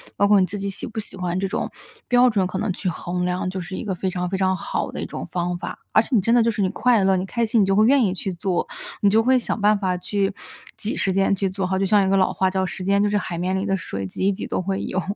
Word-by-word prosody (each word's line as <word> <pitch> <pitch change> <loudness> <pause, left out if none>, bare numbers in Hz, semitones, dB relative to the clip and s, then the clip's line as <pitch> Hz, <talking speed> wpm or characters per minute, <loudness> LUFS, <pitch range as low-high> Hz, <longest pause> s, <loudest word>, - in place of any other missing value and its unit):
包 200 - +3
括 205 0 +5
你 185 - +4
自 200 +3 -5
己 200 0 -3
喜 195 - -5
不 225 - -11
喜 210 - -5
欢 180 -1 -2
这 195 - 0
种 195 - -2 0.4
标 245 0 +5
准 195 -5 +1
可 185 - -4
能 210 0 -1
去 185 - -4
衡 180 +1 -2
量 180 0 -1
就 185 0 -4
是 180 +2 -6
一 - - -5
个 200 - -2
非 185 +1 -2
常 180 -1 -3
非 190 - -1
常 190 0 +2
好 180 - -3
的 - - -4
一 - - -3
种 85 - -6
方 175 0 -2
法。 175 - -6
而 215 - +5
且 - - -8
你 210 - +4
真 230 +5 +2
的 240 - +5
就 230 - +2
是 210 -2 -2
你 185 - +2
快 230 +1 +2
乐， 190 0 +3
你 185 - -2
开 235 +4 -1
心 220 -1 +2
你 - - +4
就 195 0 +1
会 215 +2 +5
愿 275 +2 +5
意 195 -6 +2
去 190 +1 -3
做， 180 0 -1 0.4
你 200 - +5
就 220 +2 +4
会 255 +2 +4
想 235 - -2
办 210 +1 +4
法 185 -2 -1
去 200 +2 -1 0.4
挤 210 - -1
时 195 - 0
间 195 +1 +2
去 195 0 -1
做， 190 0 -2
好 190 +1 0
就 195 - +1
像 200 0 +4
一 - - +1
个 195 - +3
老 190 -1 +3
话 190 -1 +1
叫： 190 0 0
“时 185 - -5
间 200 +2 +2
就 210 - +2
是 210 - +1
海 180 -4 -3
面 180 +2 -1
里 190 +1 -1
的 195 -1 +1
水， 100 - -5
挤 140 - -3
一 200 - +4
挤 200 - -5
都 - - -1
会 195 +1 -2
有。” 185 - -1
195 Hz, 345 characters per minute, -22 LUFS, 185-205 Hz, 0.4 s, 括